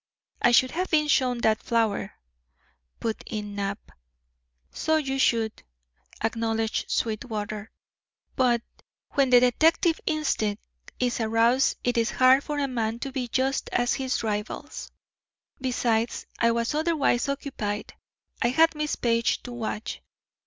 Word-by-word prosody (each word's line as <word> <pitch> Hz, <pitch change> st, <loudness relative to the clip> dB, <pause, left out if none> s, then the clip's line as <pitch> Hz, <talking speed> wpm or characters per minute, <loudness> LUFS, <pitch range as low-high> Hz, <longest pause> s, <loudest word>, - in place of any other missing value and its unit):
"I -, -, +5 dB
should 255 Hz, +2 st, +5 dB
have 365 Hz, +3 st, -2 dB
been 305 Hz, -2 st, +3 dB
shown 250 Hz, -4 st, +2 dB
that 220 Hz, -1 st, +2 dB
flower," 225 Hz, -3 st, 0 dB, 0.9 s
put 225 Hz, -1 st, -3 dB
in 210 Hz, -3 st, -5 dB
Knapp. 200 Hz, +1 st, -4 dB, 0.8 s
"So 315 Hz, -, 0 dB
you 270 Hz, -3 st, -1 dB
should," 225 Hz, -4 st, +1 dB, 0.6 s
acknowledged 225 Hz, -1 st, -1 dB
Sweetwater, 215 Hz, -1 st, -3 dB, 0.7 s
"but 240 Hz, -3 st, +2 dB, 0.5 s
when 275 Hz, -3 st, +2 dB
the 250 Hz, -1 st, +8 dB
detective 320 Hz, +7 st, +3 dB
instinct 225 Hz, -9 st, 0 dB, 0.4 s
is 245 Hz, -1 st, 0 dB
aroused 230 Hz, +4 st, +3 dB
it 245 Hz, -1 st, +1 dB
is 230 Hz, -, +1 dB
hard 260 Hz, +2 st, +5 dB
for 295 Hz, -, -4 dB
a 285 Hz, -1 st, 0 dB
man 230 Hz, -3 st, -2 dB
to 270 Hz, +3 st, -5 dB
be 260 Hz, -2 st, -3 dB
just 265 Hz, +3 st, 0 dB
to 245 Hz, -, +1 dB
his 260 Hz, 0 st, -1 dB
rivals; 215 Hz, +7 st, -4 dB, 0.7 s
besides, 240 Hz, -3 st, 0 dB
I 230 Hz, -, +4 dB
was 230 Hz, +2 st, 0 dB
otherwise 300 Hz, -5 st, +1 dB
occupied. 225 Hz, -7 st, -4 dB, 0.5 s
I -, -, +3 dB
had 325 Hz, +7 st, +4 dB
Miss 300 Hz, -1 st, -2 dB
Page 230 Hz, -1 st, +1 dB
to 245 Hz, -, -7 dB
watch. 220 Hz, -2 st, -4 dB
240 Hz, 130 wpm, -26 LUFS, 225-270 Hz, 0.9 s, the